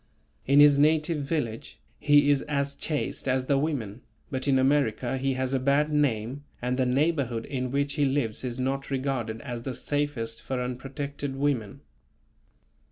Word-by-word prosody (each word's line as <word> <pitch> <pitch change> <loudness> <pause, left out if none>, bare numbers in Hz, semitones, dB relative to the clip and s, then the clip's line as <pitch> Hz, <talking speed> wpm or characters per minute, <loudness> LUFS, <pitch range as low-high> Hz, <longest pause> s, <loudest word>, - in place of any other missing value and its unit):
In 140 +2 +5
his 145 -1 +7
native 155 +1 +3
village 135 -6 -3 0.2
he 145 -1 +5
is 140 -1 +2
as 140 -1 -1
chaste 150 -2 -3
as 130 0 +1
the 140 0 +2
women, 130 -8 -3 0.3
but 130 0 -2
in 135 -1 +4
America 130 -2 +1
he 135 0 0
has 130 0 -2
a 135 - +2
bad 140 +3 +2
name 135 -2 0 0.2
and 125 +1 -1
the 130 -1 +1
neighbourhood 135 -4 0
in 130 -2 -3
which 140 +2 0
he 145 -2 +1
lives 130 -5 -1
is 125 -1 -4
not 135 +2 -2
regarded 130 -5 -2
as 120 -4 -5
the 130 +1 -5
safest 130 -6 -2
for 130 +3 -3
unprotected 135 +2 -4
women. 135 -7 -1
135 Hz, 165 wpm, -27 LUFS, 125-145 Hz, 0.3 s, his